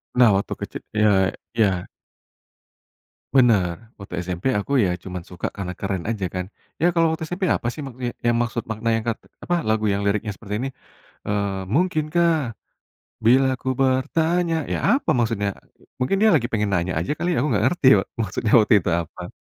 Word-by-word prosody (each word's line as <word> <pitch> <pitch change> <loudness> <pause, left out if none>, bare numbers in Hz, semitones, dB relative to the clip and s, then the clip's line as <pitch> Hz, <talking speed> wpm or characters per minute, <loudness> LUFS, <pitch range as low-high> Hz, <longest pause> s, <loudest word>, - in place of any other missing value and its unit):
Nah, 125 -2 +6
waktu 100 - -2
kecil. - - -6
Iya 105 0 +4 0.5
iya. 95 -5 +2 1.5
Benar, 105 -10 +4 0.2
waktu 100 -2 -10
SMP 90 -1 -5
aku 100 - -6
ya, - - +1
cuman 90 -1 -5
suka 90 - -6
karena 90 -2 -4
keren 95 -3 -2
aja 105 -4 -2
kan. 90 -1 -2 0.4
Ya - - +3
kalau 165 -1 +3
waktu 160 0 -3
SMP 175 +3 -4
apa 120 - -3
sih 150 - -7
maksud 130 -2 -10 0.3
ya 120 - +4
maksud 120 0 -2
makna 110 +1 -2
yang 115 - -2
kat 115 - 0 0.3
apa, 175 - 0
lagu 110 0 +1
yang 100 - -1
liriknya 105 +1 0
seperti 105 -1 -6
ini, 135 - -2 0.6
eee, 100 -1 0 0.2
"Mungkinkah, 170 0 +2 0.9
bilaku 130 +2 +3
bertanya," 165 +6 +1 0.2
ya - - 0 0.2
apa 275 - -1
maksudnya? 110 -3 0 0.3
Mu - - -24 0.2
mungkin 130 +10 +1
dia 220 - +6
lagi 125 -7 +2
pengen 105 -2 0
nanya 90 -1 0
aja 85 - -2
kali 175 - -1
ya, - - -1
aku 135 - +1
nggak 105 -3 +1
ngerti, 135 -2 +1
wak - - -4
maksudnya 105 +1 -2
waktu 110 +2 +3
itu 90 - -3
apa. 80 - -10
115 Hz, 180 wpm, -23 LUFS, 100-135 Hz, 1.5 s, Nah